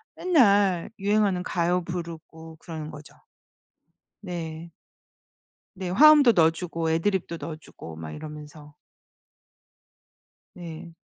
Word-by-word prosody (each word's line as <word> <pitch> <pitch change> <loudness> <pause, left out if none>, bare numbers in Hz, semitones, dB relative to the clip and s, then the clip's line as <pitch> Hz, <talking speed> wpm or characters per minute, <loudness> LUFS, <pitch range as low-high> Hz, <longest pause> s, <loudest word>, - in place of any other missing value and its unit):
맨날 205 - +3
유행하는 200 -2 +1
가요 175 0 0
부르고 165 -2 -8
그러는 160 -2 -8
거죠. 150 0 -12 1.1
네. 170 -3 -6 1.0
네 185 -1 -5
화음도 285 +5 +7
넣어주고 165 -1 +1
애드리브도 170 +1 -1
넣어주고 155 - -10
막 80 -1 -8
이러면서. 150 - -10 1.8
네. 170 -1 -9
170 Hz, 215 characters per minute, -25 LUFS, 160-190 Hz, 1.8 s, 화음도